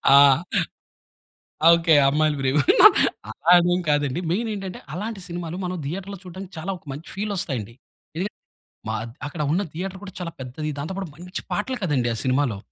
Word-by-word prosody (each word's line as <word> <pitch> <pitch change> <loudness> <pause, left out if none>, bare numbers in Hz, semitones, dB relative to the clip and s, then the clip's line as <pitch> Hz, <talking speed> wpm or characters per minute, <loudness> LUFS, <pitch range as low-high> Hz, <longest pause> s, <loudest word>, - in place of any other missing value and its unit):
ఆ! - - +10 1.6
ఓకే. 165 -1 +5
అమ్మాయిలు 150 +1 +2
ప్రేమికుడు. 135 +1 +6 0.7
అదేం 175 +1 +4
కాదండి. 145 +1 +1
మెయిన్ 225 +5 -1
ఏంటంటే, 195 -2 -6
అలాంటి 210 +3 -4
సినిమాలు 175 0 -5
మనం 180 0 -2
థియేటర్‌లో 195 +5 -5
చూడడానికి 185 +1 -9
చాలా 170 +5 -4
ఒక - - -32
మంచి 150 +5 -9
ఫీల్ 205 +1 -2
వస్తాయండి. 120 - -3 0.4
ఎందుకంటే, 190 +5 -3 0.5
మ - - -1 0.4
అక్కడ 155 +2 -8
ఉన్న 180 +5 +2
థియేటర్ 190 +3 -5
కూడా 190 -2 -9
చాలా 170 -2 -4
పెద్దది. 130 +4 -4
దాంతో 160 +6 -4
పాటు 190 -5 -4
మంచి 180 +3 -6
పాటలు 255 +5 -1
కదండి 130 -8 +1
ఆ - - -3
సినిమాలో. 130 -4 +1
170 Hz, 155 wpm, -24 LUFS, 145-190 Hz, 1.6 s, ఆ